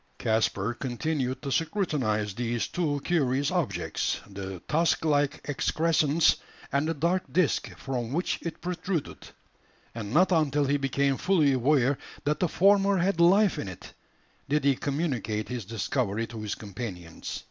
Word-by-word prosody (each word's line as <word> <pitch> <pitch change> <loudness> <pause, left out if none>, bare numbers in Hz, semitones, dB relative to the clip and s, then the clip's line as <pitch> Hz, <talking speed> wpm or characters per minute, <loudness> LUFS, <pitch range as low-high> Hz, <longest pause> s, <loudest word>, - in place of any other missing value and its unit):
Caspar 110 -1 0
continued 130 +1 -2
to 140 - -3
scrutinise 130 - 0
these 120 +1 -1
two 150 -5 -1
curious 145 -4 +1
objects 125 - -1
the 95 -2 -7
tusk 160 +1 +2
like 145 -2 +1
excrescence, 155 +1 +2 0.3
and 140 +2 +1
the 165 - -1
dark 170 +5 0
disc 180 -4 +1
from 125 -4 -3
which 175 +6 -1
it 170 - -6
protruded; 180 -2 -3 0.7
and 105 -3 -6
not 180 +8 +4
until 150 -4 +2
he 140 +1 +2
became 140 0 +1
fully 160 -8 +3
aware 135 +1 +2 0.2
that 150 +1 0
the 180 - +2
former 195 +2 +4
had 185 0 +1
life 190 +4 +5
in - - -4
it, 90 -2 -9 0.6
did 150 0 +2
he 140 -1 +4
communicate 125 - -2
his 125 -4 -4
discovery 115 0 -1
to 115 -1 -8
his 105 -1 -3
companions. 95 -5 -7
140 Hz, 145 wpm, -27 LUFS, 115-165 Hz, 0.7 s, life